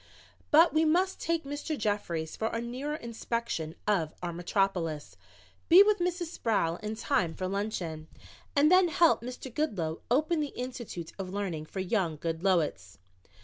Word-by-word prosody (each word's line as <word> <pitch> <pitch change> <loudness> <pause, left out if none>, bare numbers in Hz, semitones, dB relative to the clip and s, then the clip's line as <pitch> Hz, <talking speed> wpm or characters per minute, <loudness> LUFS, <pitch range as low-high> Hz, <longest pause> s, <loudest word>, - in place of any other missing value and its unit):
"But 325 +3 +6
we 315 +1 +4
must 360 +4 +2
take 330 -1 -1
Mr. 290 +2 -4
Jeffries 190 -7 -2
for 220 - -1
a 230 - -2
nearer 255 +6 -4
inspection 230 - -3
of 170 -7 +1
our 175 -1 -2
metropolis, 175 -3 -1 0.5
be 360 +4 +10
with 420 0 +2
Mrs. 350 0 -1
Sproul 200 - 0
in 215 +2 -5
time 205 - 0
for 185 - -3
luncheon 185 -6 -3 0.5
and 295 +3 +5
then 365 0 +6
help 340 -4 +4
Mr. 250 +1 -7
Goodloe 180 - -2
open 310 +6 +2
the 295 -2 -3
institute 240 -9 -6
of 190 -1 -4
learning 185 -6 -3
for 190 - -4
young 185 -5 0
Goodloets." 165 - -1
215 Hz, 150 wpm, -29 LUFS, -, 0.5 s, be